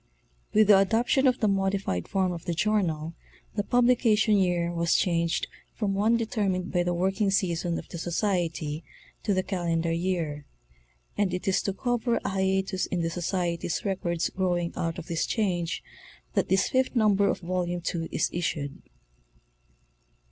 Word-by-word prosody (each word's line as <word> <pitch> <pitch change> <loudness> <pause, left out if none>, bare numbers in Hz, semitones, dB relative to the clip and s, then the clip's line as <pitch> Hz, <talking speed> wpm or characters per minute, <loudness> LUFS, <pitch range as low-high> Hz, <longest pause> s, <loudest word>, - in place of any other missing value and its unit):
With 215 0 +5
the 205 -1 +7
adoption 235 +7 +3
of 255 0 +2
the 215 - +3
modified 195 - 0
form 190 -2 +1
of 170 -2 -6
the 170 -2 -2
journal 170 -4 0 0.4
the 210 - 0
publication 235 -3 +3
year 175 -3 +1
was 170 0 +1
changed 170 -2 +1 0.3
from 205 -3 -1
one 215 +4 +3
determined 200 -5 -1
by 175 - +2
the 175 0 0
work 190 +2 +1
_ 205 - -7
ing 205 - +3
season 175 -3 0
of - - -7
the 170 - -6
Society 170 -4 -1 0.4
to 210 - -1
the 185 - +1
calendar 170 -3 -1
year; 165 -4 -1 0.8
and 190 -3 +1
it 180 - -5
is 190 - +3
to 195 - -2
cover 240 +2 0
a - - +1
hiatus 190 0 0
in 175 -2 -1
the 165 - 0
Soctmry's 175 0 -2
records 175 -4 -1
growing 175 -2 -1
out 165 -1 -2
of 170 - -6
this 165 -2 -1
change 180 -6 -1 0.5
that - - 0
this 190 -1 +3
fifth 260 0 +1
number 205 -3 +4
of - - -1
Volume 175 -1 -2
II 165 -1 -3
is - - 0
issued. 150 -5 -3
185 Hz, 165 wpm, -27 LUFS, 170-205 Hz, 0.8 s, the